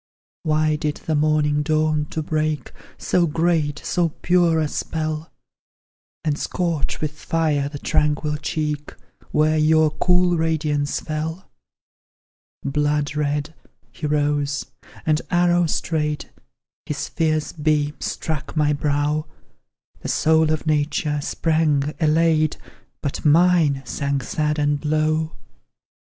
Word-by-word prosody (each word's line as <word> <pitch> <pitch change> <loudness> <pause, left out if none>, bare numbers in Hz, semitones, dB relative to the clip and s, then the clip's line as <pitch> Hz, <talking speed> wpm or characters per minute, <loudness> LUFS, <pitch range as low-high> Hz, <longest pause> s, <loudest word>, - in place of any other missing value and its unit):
Why 155 0 +1
did 150 -1 -2
the 160 - 0
morning 150 -1 +2
dawn 155 0 +1
to 160 - -4
break 155 -3 -1 0.3
So 175 -1 +1
great, 160 -2 +1
so 175 -2 +1
pure, 170 0 +2
a 155 - +1
spell; 155 +1 -3 0.9
And 150 -2 0
scorch 170 -4 -1
with 155 -1 -1
fire 150 -2 0
the 145 - -7
tranquil 150 +1 0
cheek, 150 -1 -3 0.3
Where 155 +1 +2
your 155 0 +4
cool 180 +1 +2
radiance 155 -3 0
fell? 160 +3 -4 1.1
Blood 145 +1 0
red, 150 +1 -1 0.4
he 155 - -4
rose, 145 -1 0 0.4
and, 155 0 +2
arrow 175 -1 +3
straight, 150 -1 -2 0.6
His 150 0 -3
fierce 155 -2 0
beams 150 -1 0
struck 155 0 -4
my 150 -1 +3
brow; 145 +1 0 0.7
The - - -5
soul 160 0 +3
of 155 0 -1
nature 150 -1 0
sprang, 150 -2 +1
elate, 155 -1 +3 0.5
But 140 - -3
mine 155 -3 +4
sank 140 0 -2
sad 150 +4 -1
and 145 -1 0
low! 155 +1 0
155 Hz, 115 wpm, -22 LUFS, 150-160 Hz, 1.1 s, your